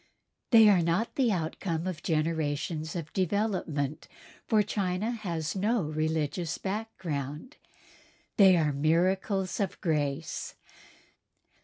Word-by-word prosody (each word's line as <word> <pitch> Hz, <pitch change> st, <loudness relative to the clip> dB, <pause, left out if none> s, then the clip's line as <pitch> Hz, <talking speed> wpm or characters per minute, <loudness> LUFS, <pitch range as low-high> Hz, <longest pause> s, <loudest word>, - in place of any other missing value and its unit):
They 225 Hz, -3 st, +8 dB
are 195 Hz, -4 st, +5 dB
not 170 Hz, +7 st, 0 dB
the 255 Hz, -5 st, +2 dB
outcome 165 Hz, -1 st, -2 dB
of 180 Hz, -4 st, -4 dB
generations 155 Hz, 0 st, -1 dB
of 160 Hz, -3 st, -5 dB
development, 180 Hz, -7 st, -1 dB, 0.4 s
for 215 Hz, -1 st, +4 dB
China 200 Hz, +1 st, -1 dB
has 170 Hz, -9 st, -3 dB
no 210 Hz, +2 st, +1 dB
religious 155 Hz, +1 st, -1 dB
background. 190 Hz, -, -5 dB, 0.8 s
They 190 Hz, -3 st, +7 dB
are 155 Hz, -3 st, +1 dB
miracles 185 Hz, +7 st, +1 dB
of 200 Hz, -3 st, -2 dB
grace. 145 Hz, -4 st, -2 dB
170 Hz, 105 wpm, -29 LUFS, 155-200 Hz, 0.8 s, They